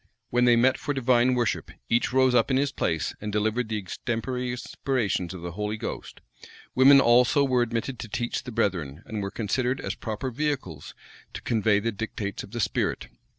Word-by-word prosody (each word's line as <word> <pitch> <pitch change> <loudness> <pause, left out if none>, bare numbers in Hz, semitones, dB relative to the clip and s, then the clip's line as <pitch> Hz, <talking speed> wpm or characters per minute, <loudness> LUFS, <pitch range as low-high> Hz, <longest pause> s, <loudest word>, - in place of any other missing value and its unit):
When 125 +1 +3
they 120 -1 +6
met 125 +3 +3
for 145 - -2
divine 125 -1 +3
worship, 120 -3 -1 0.2
each 120 +2 +1
rose 130 0 +4
up 115 -2 +3
in 130 - +2
his 140 +1 +1
place, 80 - -1
and 105 0 -4
delivered 110 +3 0
the 110 - -1
extemporary 120 +5 -3
inspirations 120 -6 -2
of 90 -3 -8
the 85 - -4
Holy 105 +4 -3
Ghost: - - -6 0.5
women 135 +2 +7
also 125 +2 +5
were 130 -3 +2
admitted 120 +1 -2
to - - -6
teach 120 +2 -2
the 125 - -8
brethren, 85 - -1
and 110 -2 -4
were 100 - -3
considered 125 +5 -1
as - - -3
proper 110 +4 -4
vehicles 130 - -3 0.4
to - - -6
convey 110 -3 +2
the 115 +3 -1
dictates 105 -1 -4
of - - -10
the 120 +3 -6
spirit. 105 - -1
120 Hz, 190 wpm, -26 LUFS, 105-125 Hz, 0.5 s, women